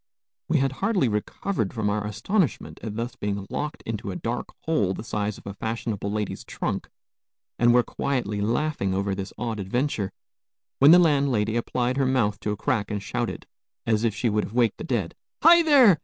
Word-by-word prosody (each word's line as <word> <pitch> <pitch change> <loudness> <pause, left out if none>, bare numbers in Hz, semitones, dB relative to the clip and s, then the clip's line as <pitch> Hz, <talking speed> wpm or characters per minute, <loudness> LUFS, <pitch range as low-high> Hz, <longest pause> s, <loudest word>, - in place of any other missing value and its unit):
We 160 - +3
had 135 -1 +2
hardly 185 - +1
recovered 110 - -2
from 110 -2 0
our 105 0 0
astonishment 145 - -1
at 105 -2 -5
thus 115 +2 -3
being 100 -1 -3
locked 150 +1 -4
into 110 -2 -4
a 95 - -4
dark 120 +5 -3 0.2
hole 105 - +1
the - - -6
size 105 -2 -2
of - - -16
a 100 - -5
fashionable 110 -1 -3
lady's 105 -1 -3
trunk, - - -3 0.7
and 120 0 +5
were 125 0 +5
quietly 115 -8 -2
laughing 115 -3 0
over 100 0 0
this 95 0 -5
odd 115 -2 -3
adventure, 105 +1 -1 0.7
when 140 - +8
the 170 - +10
landlady 140 -10 +3
applied 125 +2 0
her 135 -1 +2
mouth 115 -6 +1
to - - -3
a 105 - -3
crack 105 0 0
and 105 -1 -3
shouted, - - -3 0.4
as 110 -1 +1
if 115 -3 +1
she 105 - 0
would 105 -1 +1
have - - -10
waked 120 -3 +2
the - - -5
dead: 110 -10 -1 0.3
"Hi, 340 +2 +9
there! 265 - +6
115 Hz, 190 wpm, -25 LUFS, 105-135 Hz, 0.7 s, the